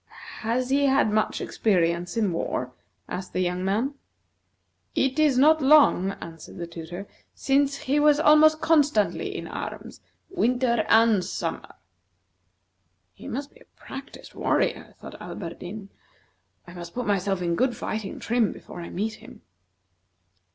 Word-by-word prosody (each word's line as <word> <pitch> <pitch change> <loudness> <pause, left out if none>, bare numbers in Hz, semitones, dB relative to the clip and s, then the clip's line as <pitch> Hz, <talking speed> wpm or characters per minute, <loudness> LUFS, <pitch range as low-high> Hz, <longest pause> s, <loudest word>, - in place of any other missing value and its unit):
"Has 245 +3 -1
he 280 +1 +3
had 265 -5 +3
much 215 0 0
experience 175 -2 0
in 205 -6 +1
war?" 130 -6 -3 0.4
asked 185 0 -6
the - - -1
young 180 0 -1
man. 220 +9 0 1.0
"It 270 +2 +1
is 295 -4 +4
not 310 +4 +5
long," 270 -10 +5
answered 165 -3 -11
the 175 - -4
tutor, 170 +3 -8 0.3
"since 275 0 +1
he 280 +3 0
was 295 0 +4
almost 310 0 +5
constantly 295 -9 +2
in - - -6
arms, - - -7 0.3
winter 245 - +1
and 225 -4 +5
summer." - - -5 1.4
"He - - -12
must 280 +4 -5
be 475 - -20
a - - -24
practised 270 +1 -10
warrior," - - -1
thought - - -11
Alberdin. 195 +3 -7 0.8
"I 175 - -12
must 175 -1 -9
put 250 0 -2
myself 195 -1 0
in 170 -1 0
good 245 +7 0
fighting 215 -2 -4
trim 230 -3 +1
before 175 - -10
I 170 - -7
meet 215 +4 -2
him." - - -14
225 Hz, 140 wpm, -25 LUFS, 180-275 Hz, 1.4 s, not